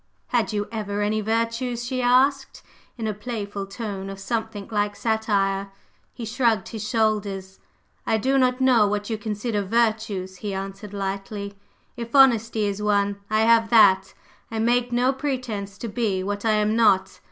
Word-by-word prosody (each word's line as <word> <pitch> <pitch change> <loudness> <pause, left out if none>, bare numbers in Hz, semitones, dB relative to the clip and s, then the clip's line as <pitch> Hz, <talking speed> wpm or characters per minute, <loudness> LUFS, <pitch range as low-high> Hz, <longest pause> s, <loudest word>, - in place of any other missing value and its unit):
"Had 235 -2 +1
you 205 0 -2
ever 205 -2 -2
any 215 +1 0
virtues?" 230 +2 -1
she 255 +1 -2
asked 265 +2 +2 0.3
in 225 - -4
a 215 - -1
playful 205 -2 -5
tone 200 -2 -5
of 195 - -7
something 220 -1 -3
like 205 -1 0
satire. 200 -3 0 0.4
He 235 - -7
shrugged 225 -3 +1
his 215 -1 -5
shoulders. 205 -5 -1 0.4
"I 220 - +1
do 265 +5 +2
not 255 0 +2
know 250 -5 +4
what 205 +2 -2
you 220 - -2
consider 210 0 -2
virtues," 215 -3 0
he 200 0 -4
answered 195 +1 -6
lightly: 200 +1 -4 0.4
"If 235 +1 -6
honesty 230 -5 +5
is 200 0 -2
one, 205 -1 +1
I 215 0 +2
have 225 0 +4
that. 195 -4 +5 0.3
I 225 - -5
make 240 +2 +1
no 250 +2 +2
pretence 250 -8 -4
to 235 - -5
be 205 -4 -1
what 205 +2 -3
I 220 - +3
am 210 +1 +2
not. 195 -4 +3
215 Hz, 165 wpm, -24 LUFS, 200-235 Hz, 0.4 s, honesty